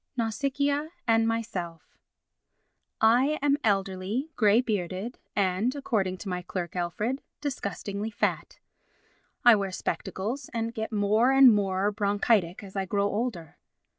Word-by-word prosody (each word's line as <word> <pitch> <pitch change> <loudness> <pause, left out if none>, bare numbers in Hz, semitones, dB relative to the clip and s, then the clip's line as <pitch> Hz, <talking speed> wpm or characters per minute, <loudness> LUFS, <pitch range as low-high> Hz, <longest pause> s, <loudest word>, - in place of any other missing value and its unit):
Nausicaa 280 +6 0 0.2
and 225 0 +4
Myself 205 -8 -4 1.0
I 250 +7 +4
am 285 0 +3
elderly, 200 +6 -1
grey 215 0 +4
bearded 205 -1 -3 0.2
and, 200 +6 +1
according 205 -9 -1
to 205 - -9
my 180 -1 -2
clerk, 175 0 -5
Alfred, 210 +10 -2 0.2
disgustingly 205 -6 -4
fat; 215 +1 -2 0.9
I 240 -2 +9
wear 200 -2 -1
spectacles 215 +7 -4
and 230 0 -2
get 220 -1 -4
more 215 +4 +3
and 270 -3 +8
more 195 0 +1
bronchitic 205 -3 +1
as 195 -1 -11
I 195 -1 -1
grow 200 +1 0
older. 205 -8 -4
210 Hz, 125 wpm, -27 LUFS, 190-240 Hz, 1.0 s, I